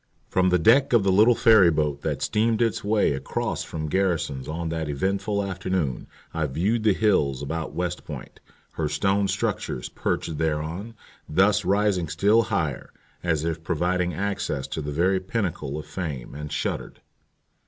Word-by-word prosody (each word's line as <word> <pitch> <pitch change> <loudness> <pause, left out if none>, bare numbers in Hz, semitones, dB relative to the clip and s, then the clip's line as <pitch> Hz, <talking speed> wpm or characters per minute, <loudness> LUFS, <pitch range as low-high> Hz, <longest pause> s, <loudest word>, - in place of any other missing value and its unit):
From 95 0 +2
the 90 - +4
deck 120 - +4
of 115 -4 +5
the 95 - +3
little 110 +5 +5
ferry 110 -8 +6
boat 75 -3 0
that - - -2
steamed 110 +1 +1
its 115 -2 0
way 105 -6 +2
across 65 - -3
from 80 -1 -5
Garrison's 80 -7 -1
on 80 +1 -3
that 80 -2 -3
eventful 100 +7 -1
afternoon 95 -8 -2 0.3
I 80 -2 0
viewed 95 - 0
the 105 -3 +3
hills 70 -11 +2
about 80 +3 -4
West 90 -2 -2
Point, - - -9 0.3
her 75 -2 -2
stone 100 +6 +1
structures 60 - -2
perched 80 -3 -2
thereon, 80 +8 -2 0.3
thus 100 +6 +3
rising 95 -2 +1
still 100 +8 +4
higher, - - -2 0.3
as 80 -4 0
if 80 -1 -3
providing 90 +2 0
access 100 -8 -2
to 75 +3 -3
the 75 0 -4
very 90 +5 +2
pinnacle 90 -8 -3
of 75 - -6
fame, 75 -6 -5
and 75 +1 -7
shuddered. - - -3
90 Hz, 160 wpm, -25 LUFS, 75-100 Hz, 0.3 s, ferry